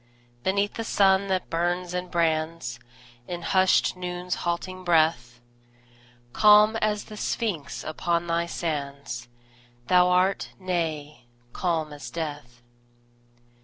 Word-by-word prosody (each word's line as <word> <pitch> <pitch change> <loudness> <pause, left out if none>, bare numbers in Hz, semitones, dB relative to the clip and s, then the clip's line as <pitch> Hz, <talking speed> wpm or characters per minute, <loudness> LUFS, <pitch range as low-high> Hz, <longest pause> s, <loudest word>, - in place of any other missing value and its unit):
Beneath 200 +4 0
the 225 - -4
sun 195 -2 +3
that 190 -1 -2
burns 175 +1 -1
and 180 0 -3
brands 160 -6 -1 0.5
In 175 -1 -5
hushed 190 -1 +3
Noon's 180 0 -4
halting 185 +2 -3
breath, 155 -9 +2 0.9
Calm 210 +1 +6
as 210 -1 0
the 215 - -10
Sphinx 195 -9 -3
upon 170 +2 -1
thy 170 0 0
sands 140 -7 -4 0.6
Thou 180 0 +5
art 185 +2 +1
nay, 160 -7 -3 0.3
calm 160 -4 -1
as 145 - -8
death. 145 -7 -6
175 Hz, 110 wpm, -26 LUFS, 155-185 Hz, 0.9 s, Calm